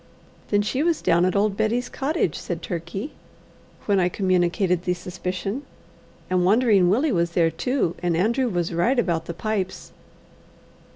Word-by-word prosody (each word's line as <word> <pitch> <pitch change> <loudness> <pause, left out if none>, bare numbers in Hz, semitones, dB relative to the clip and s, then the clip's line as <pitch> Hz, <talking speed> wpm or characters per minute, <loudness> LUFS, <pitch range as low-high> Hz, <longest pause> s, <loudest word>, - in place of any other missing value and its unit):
"Then 205 0 +2
she 255 +6 -1
was 335 0 +1
down 170 +1 +3
at 185 - 0
old 200 0 +2
Betty's 235 +4 0
cottage," 275 - -1
said 175 -2 -5
Turkey, 190 - -5 0.7
when 200 -2 +2
I 180 -1 +2
communicated 180 -1 +1
the 180 0 -1
suspicion, 185 +6 -4 0.7
"and 185 -1 +1
Wandering 205 -2 +4
Willie 265 - +2
was 170 -2 0
there 165 -2 +3
too, 250 - -1
and 175 -2 0
Andrew 235 +7 +1
was 175 -3 -2
right 205 +11 +2
about 170 -8 0
the 170 - -6
pipes. 195 -2 -3
185 Hz, 155 wpm, -23 LUFS, 175-225 Hz, 0.7 s, Wandering